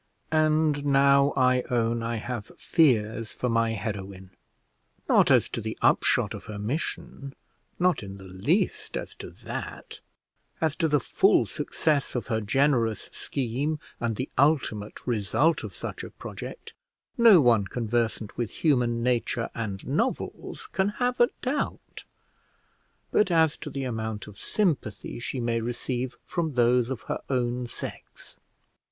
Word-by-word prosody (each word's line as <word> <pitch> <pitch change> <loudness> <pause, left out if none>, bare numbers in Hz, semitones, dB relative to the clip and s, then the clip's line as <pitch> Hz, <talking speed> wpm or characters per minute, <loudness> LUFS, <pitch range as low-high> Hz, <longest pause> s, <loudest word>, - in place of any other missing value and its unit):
And 155 -2 +2
now 140 0 +5
I 130 -1 +4
own 115 -1 +1
I 115 +1 -2
have 115 -1 -5
fears 115 -8 +2
for 125 - -2
my 115 -1 +2
heroine; 100 -3 -5 0.8
not - - +5
as - - +5
to - - -4
the - - -5
upshot - - +3
of - - -8
her 105 - -6
mission, 135 +3 -4 0.4
not 180 -2 +2
in 100 -1 -8
the 95 - -12
least 160 - 0
as - - -6
to - - -8
that; - - -7 0.6
as 160 -2 +1
to 165 - +2
the 150 -1 +3
full - - +3
success 150 -4 -1
of 125 - -3
her 110 -2 0
generous 115 -1 +1
scheme, 140 +4 -2 0.2
and 115 -2 -1
the 130 +5 -3
ultimate 130 -8 +1
result 120 +7 +1
of - - -7
such - - -5
a - - -7
project, - - -8 0.4
no 230 -7 +8
one 120 -7 +4
conversant 115 -2 -1
with 120 -3 -1 0.2
human 120 -5 +2
nature 120 -1 0
and 100 -4 -4
novels 235 - -2
can 200 - 0
have 245 0 0
a 240 - +6
doubt; 275 +3 -3 1.1
but 210 - +3
as 160 -3 +3
to - - -6
the 135 - -4
amount 110 -4 -3
of 105 -1 -12
sympathy 160 - -1
she 130 +1 -4
may 115 -1 0
receive 120 +2 -3
from 165 -4 -2
those 120 0 +3
of 130 - -4
her - - -4
own 125 -1 0
sex. - - -8
125 Hz, 145 wpm, -27 LUFS, 115-150 Hz, 1.1 s, no